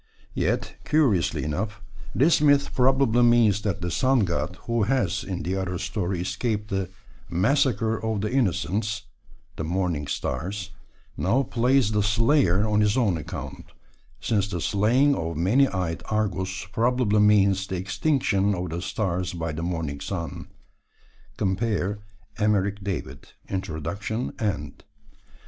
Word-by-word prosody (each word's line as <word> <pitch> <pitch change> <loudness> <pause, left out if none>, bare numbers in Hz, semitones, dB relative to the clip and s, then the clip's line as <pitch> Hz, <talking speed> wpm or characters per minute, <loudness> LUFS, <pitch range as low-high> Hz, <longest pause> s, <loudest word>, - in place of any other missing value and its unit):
Yet, - - -1
curiously 130 - +2
enough, 105 +8 -3 0.4
this 150 +3 +4
myth 145 -1 +3
probably 130 -2 +3
means 120 -4 +4
that 100 -2 -2
the 90 0 -2
Sun 130 +7 +3
God, 90 -1 -1
who 115 -1 0
has 105 -4 +1
in 95 -3 -4
the 90 +4 -2
other 90 -2 -2
story 95 -1 -2
escaped 105 +3 -2
the 95 -2 -1 0.4
"massacre 110 - +1
of 110 -2 -1
the 105 - -2
innocents" 105 -3 0 0.5
(the - - -3
morning 85 -3 -1
stars), 95 +9 -3 0.4
now 135 +4 +1
plays 125 -1 +2
the 105 -1 +2
slayer 105 - +3
on 105 0 +2
his 105 +3 +2
own 110 -8 +2
account, 80 - -7 0.5
since 100 -3 0
the 90 -4 -4
slaying 115 - +3
of 85 - -3
many 115 - +4
eyed 90 -6 -3
Argus 95 -3 -1
probably 115 -2 +2
means 100 -2 +4
the 95 - -3
extinction 100 - +1
of 90 -2 -4
the 85 +2 -3
stars 95 -3 -2
by 85 -2 -3
the 75 +2 -5
morning 80 -5 -3
sun 85 -1 -5 0.9
(cp. 100 0 -1 0.4
Emeric 100 -1 +1
David, 75 -8 -5
Introduction, 95 - -3
end). 95 -10 -3
100 Hz, 135 wpm, -25 LUFS, 90-115 Hz, 0.9 s, this